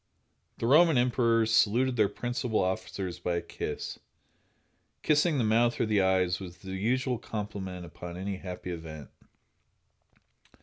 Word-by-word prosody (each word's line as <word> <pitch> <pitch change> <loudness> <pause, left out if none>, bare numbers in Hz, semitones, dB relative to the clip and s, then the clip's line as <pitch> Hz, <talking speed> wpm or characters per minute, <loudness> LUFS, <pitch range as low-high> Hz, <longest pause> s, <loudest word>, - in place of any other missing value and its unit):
The - - -3
Roman 155 +3 +6
emperors 115 -2 +2
saluted 120 +4 +3
their 105 -4 +3
principal 120 -2 -2
officers 95 -1 -3
by 90 0 -1
a 85 - -1
kiss. - - -5 1.0
Kissing 150 +1 +3
the 125 - +2
mouth 115 +2 +2
or - - +2
the 105 -2 +2
eyes 95 -1 +2
was 90 -2 -9
the 95 0 -9
usual 125 +5 0
compliment 100 -4 -5
upon 85 +1 -8
any 95 +1 -3
happy 90 -1 -6
event. 80 -4 -8
105 Hz, 135 wpm, -29 LUFS, 90-120 Hz, 1.0 s, Roman